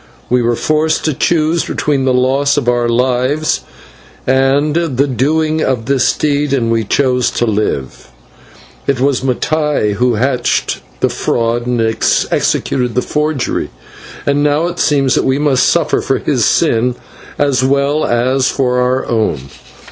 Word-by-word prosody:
"We 125 0 +3
were 120 0 +1
forced 155 +4 0
to 155 - +1
choose 160 +3 +1
between 140 -3 -1
the 130 - +2
loss 135 +3 +1
of 135 -4 -1
our 120 -1 +1
lives 130 +5 0 0.6
and 135 +3 +2
the 145 -6 +1
doing 155 +5 0
of 125 -6 -1
this 135 0 +2
deed, 145 -1 -1
and 115 -4 0
we 115 -1 +1
chose 125 +2 +1
to 120 - -1
live. 105 - -2 0.8
It 140 -2 0
was 135 -1 +1
Mattai 145 -3 0
who 120 +3 +1
hatched 125 +2 -1 0.2
the - - +2
fraud 120 +1 -1
and 125 -1 0 0.5
executed 125 -3 0
the 125 - +1
forgery, 150 -3 -2 0.6
and 145 0 +1
now 150 +2 +1
it 175 0 -4
seems 140 -3 +2
that - - +1
we 130 0 +1
must 145 -3 +2
suffer - - +1
for - - 0
his - - 0
sin 120 +2 +1 0.4
as 140 -3 +1
well 140 +3 +1
as 130 +2 +1
for 125 -2 0
our 125 +1 0
own. 110 - 0
130 Hz, 150 wpm, -14 LUFS, 125-145 Hz, 0.8 s, We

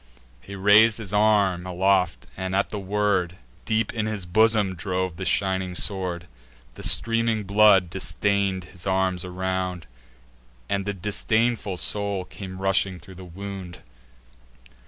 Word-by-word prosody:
He 100 +8 -9
rais'd 105 +3 +5
his 105 -3 -7
arm 100 -4 +2
aloft, 90 -7 +1
and, 95 0 -3
at 100 - 0
the 105 - -4
word, 95 -3 0 0.3
Deep 110 -1 0
in 110 -2 -2
his 105 -4 -4
bosom 105 +1 +3
drove 90 0 -3
the 95 - -5
shining 95 -2 0
sword. 90 -3 -2 0.5
The - - -11
streaming 115 -1 +3
blood 100 -3 +4
distain'd 100 0 -1
his 90 0 -10
arms 95 -1 0
around; 90 -1 -3 0.8
And 100 +5 -2
the 100 - -2
disdainful 105 +1 -1
soul 100 -1 0
came 95 -1 -9
rushing 95 -1 +1
through 95 +5 -13
the 95 +1 -11
wound. 95 0 -8
95 Hz, 135 wpm, -24 LUFS, 90-105 Hz, 0.8 s, rais'd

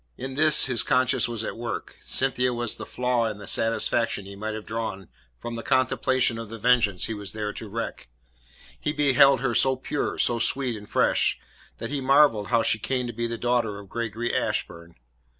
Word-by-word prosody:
In 130 +1 -6
this 155 +2 +6
his 125 -4 +2
conscience 130 -1 +2
was 115 -2 -4
at - - -5
work. 115 0 -6
Cynthia 125 -2 -1
was 120 -2 0
the - - -8
flaw 125 -2 0
in 105 -2 -5
the 105 - -10
satisfaction 115 -2 0
he 100 0 -10
might 110 +2 -4
have 110 - -7
drawn 110 -4 -5 0.3
from 120 0 -6
the 115 - -5
contemplation 130 -2 +1
of 115 -2 -7
the 115 - -7
vengeance 110 -6 +2
he 115 - -4
was 105 -2 -6
there 105 -1 -3
to 110 - -7
wreak. 115 - -6 0.7
He 150 - -2
beheld 140 -2 +4
her - - 0
so 130 0 +3
pure, 130 +3 -3
so 120 -1 +2
sweet 130 0 +1
and 105 -1 -11
fresh, - - +2 0.4
that 115 +3 -6
he 145 -2 -2
marvelled 135 -6 +4
how 115 -2 +2
she 110 - +1
came 125 +3 -2
to 120 - -5
be 120 +1 -2
the 115 0 -4
daughter 120 -3 0
of 100 -1 -12
Gregory 115 +1 -3
Ashburn. 85 0 -3
115 Hz, 200 wpm, -25 LUFS, 110-130 Hz, 0.7 s, this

